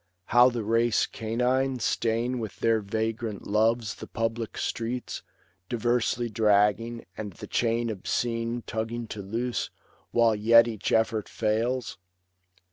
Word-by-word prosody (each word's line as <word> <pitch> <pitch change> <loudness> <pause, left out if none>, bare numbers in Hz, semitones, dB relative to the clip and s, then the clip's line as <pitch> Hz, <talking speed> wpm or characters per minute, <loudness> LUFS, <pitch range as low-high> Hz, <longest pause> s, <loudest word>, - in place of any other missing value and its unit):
how 120 +2 +6
the 120 -3 -3
race 115 +2 +2
canine 125 +4 0
Stain 120 +2 0
with 110 -3 -6
their 115 -1 +3
vagrant 110 +1 -3
loves 110 +1 +1
the - - -10
public 115 -1 -3
streets, 120 +2 -3 0.5
Diversely 120 0 +1
dragging, 110 +1 +2
and 105 -3 -6
the - - -9
chain 115 0 0
obscene 115 +3 -2
Tugging 115 +1 -3
to 105 - -5
loose, 115 +5 -2 0.4
while 115 -1 +4
yet 115 +2 +6
each 110 -3 -3
effort 110 -1 +1
fails 115 +3 -1
115 Hz, 125 wpm, -27 LUFS, 110-120 Hz, 0.5 s, how